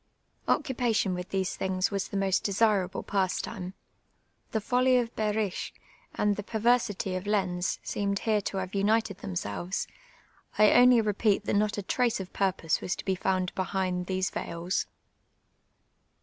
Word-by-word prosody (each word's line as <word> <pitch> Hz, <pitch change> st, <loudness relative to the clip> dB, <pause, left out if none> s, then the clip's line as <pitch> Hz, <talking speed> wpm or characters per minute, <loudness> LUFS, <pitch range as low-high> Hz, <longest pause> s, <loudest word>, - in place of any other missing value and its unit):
Occupation 235 Hz, -8 st, +1 dB
with 180 Hz, 0 st, -5 dB
these 190 Hz, -1 st, -1 dB
thinj^ 185 Hz, 0 st, -1 dB
was 195 Hz, -1 st, -2 dB
tlie 200 Hz, -, -3 dB
most 195 Hz, -1 st, +1 dB
desiral)le 205 Hz, -2 st, +1 dB
pastime. 185 Hz, -1 st, -2 dB, 0.8 s
The -, -, 0 dB
follv 250 Hz, +3 st, +3 dB
of 235 Hz, -1 st, -3 dB
IJehrisch 210 Hz, -2 st, -1 dB, 0.4 s
and 205 Hz, -1 st, +1 dB
the -, -, -2 dB
p(nirsity 220 Hz, -3 st, +1 dB
(tf -, -, -14 dB
Ix'uz 185 Hz, -3 st, 0 dB
seemed 200 Hz, -1 st, -1 dB
here 215 Hz, 0 st, +1 dB
to 195 Hz, -, -4 dB
have 185 Hz, 0 st, -4 dB
united 205 Hz, 0 st, +1 dB
themselves; 100 Hz, -, -3 dB, 0.7 s
I 215 Hz, 0 st, +6 dB
only 245 Hz, -1 st, +7 dB
repeat 210 Hz, -1 st, +1 dB
that -, -, -1 dB
not 210 Hz, +1 st, +1 dB
a 205 Hz, -, -3 dB
trace 240 Hz, +3 st, +1 dB
of 190 Hz, -1 st, -7 dB
piu 195 Hz, -1 st, +2 dB
pose 165 Hz, -3 st, -1 dB
was 180 Hz, -, -2 dB
to -, -, -8 dB
be 190 Hz, -, +1 dB
found 185 Hz, -1 st, -1 dB
behind 185 Hz, -1 st, -1 dB
thcBc 185 Hz, 0 st, -1 dB
veils. 170 Hz, +3 st, -2 dB
200 Hz, 150 wpm, -28 LUFS, 185-215 Hz, 0.8 s, only